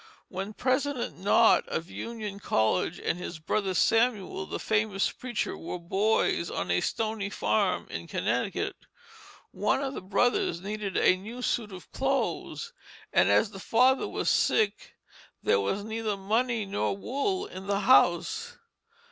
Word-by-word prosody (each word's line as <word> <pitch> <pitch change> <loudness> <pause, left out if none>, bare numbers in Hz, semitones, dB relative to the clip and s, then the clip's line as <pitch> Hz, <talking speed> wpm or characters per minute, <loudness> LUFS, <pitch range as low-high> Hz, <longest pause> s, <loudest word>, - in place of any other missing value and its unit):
When 195 +3 -5
President 260 -3 -1
Nott 210 +4 +4
of 165 +2 -4
Union 215 -4 -6
College, 110 - +1
and 175 - -2
his 175 -1 -6
brother 190 +4 -1
Samuel, 215 -2 +2
the - - -4
famous 210 -2 0
preacher, 245 -3 -3
were 175 - -5
boys 190 0 +1
on 90 0 -2
a 90 - +2
stony 220 -3 -2
farm - - 0
in - - -5
Connecticut, - - -1 0.8
one - - +1
of 270 0 -3
the - - -5
brothers 195 -2 +1
needed 205 +1 -4
a - - +5
new 225 +7 -8
suit 220 -4 -1
of 185 -1 -11
clothes, 275 - -2 0.4
and - - +4
as 215 - +3
the 195 - -9
father 255 +7 +3
was - - -3
sick 210 -1 +1 0.5
there - - +3
was 145 - -1
neither 220 -1 -2
money 225 +3 0
nor 195 0 -1
wool 370 - -1
in 190 - -9
the 200 0 +1
house. 255 - +3
210 Hz, 145 wpm, -28 LUFS, 190-240 Hz, 0.8 s, a